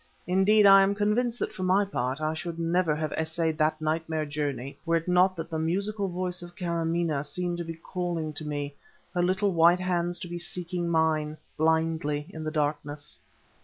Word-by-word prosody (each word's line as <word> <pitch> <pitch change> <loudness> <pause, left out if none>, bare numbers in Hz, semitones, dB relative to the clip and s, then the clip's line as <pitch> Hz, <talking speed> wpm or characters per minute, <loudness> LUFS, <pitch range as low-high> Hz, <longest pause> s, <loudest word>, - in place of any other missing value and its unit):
Indeed, 195 +4 +4
I 195 0 +9
am 195 +1 +2
convinced 225 +4 +1
that - - -3
for 200 - -7
my 185 +2 +3
part 135 -5 -2
I 155 0 0
should 165 +1 -5
never 170 -1 +1
have 155 0 -2
essayed 160 0 -1
that 155 0 +2
nightmare 160 0 -1
journey 145 -3 -4
were 170 0 +1
it 165 +1 -1
not 180 +1 +4
that 165 0 -6
the 160 - -1
musical 200 +5 -1
voice 180 0 -2
of 175 0 -11
Kâramaneh 170 -4 -1
seemed 175 +4 -3
to - - -2
be 165 0 -6
calling 170 -2 -3
to 155 - -6
me, 145 -1 -3 0.4
her 180 - +1
little 190 +3 +2
white 170 +2 +5
hands 175 -1 0
to - - -5
be 175 0 -5
seeking 175 0 -2
mine, 155 -2 +1 0.2
blindly, 160 -2 +1
in 160 -3 -7
the 155 - -2
darkness. 150 -1 -3
165 Hz, 190 wpm, -27 LUFS, 155-180 Hz, 0.4 s, I